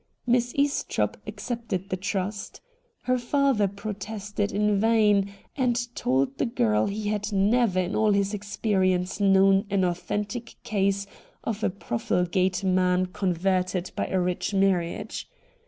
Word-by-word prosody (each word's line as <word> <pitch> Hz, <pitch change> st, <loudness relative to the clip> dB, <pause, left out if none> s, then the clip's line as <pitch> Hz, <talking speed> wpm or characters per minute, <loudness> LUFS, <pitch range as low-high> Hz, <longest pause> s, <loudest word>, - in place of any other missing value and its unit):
Miss 245 Hz, 0 st, +2 dB
Estropp 285 Hz, +1 st, 0 dB
accepted 220 Hz, -6 st, -4 dB
the 185 Hz, -, 0 dB
trust. 200 Hz, +1 st, -3 dB, 0.4 s
Her 255 Hz, 0 st, +1 dB
father 255 Hz, -4 st, +2 dB
protested 205 Hz, +1 st, -4 dB
in 210 Hz, 0 st, +2 dB
vain, 210 Hz, -3 st, +3 dB, 0.2 s
and 240 Hz, -2 st, 0 dB
told 130 Hz, +2 st, 0 dB
the -, -, +2 dB
girl 110 Hz, -, +1 dB
he 205 Hz, +1 st, -3 dB
had 210 Hz, 0 st, -2 dB
never 205 Hz, 0 st, +2 dB
in 180 Hz, +2 st, -3 dB
all 215 Hz, -1 st, +3 dB
his 200 Hz, 0 st, +1 dB
experience 195 Hz, -3 st, 0 dB
known 195 Hz, 0 st, +4 dB
an 195 Hz, -1 st, +1 dB
authentic 205 Hz, +6 st, -3 dB
case 200 Hz, -2 st, 0 dB, 0.4 s
of 220 Hz, -1 st, -3 dB
a -, -, +3 dB
profligate 180 Hz, -, -1 dB
man 185 Hz, -1 st, +2 dB
con 190 Hz, -4 st, 0 dB
verted 185 Hz, 0 st, 0 dB
by -, -, -2 dB
a 190 Hz, -, 0 dB
rich 180 Hz, +3 st, -1 dB
marriage. 190 Hz, -3 st, 0 dB
200 Hz, 135 wpm, -26 LUFS, 185-215 Hz, 0.4 s, known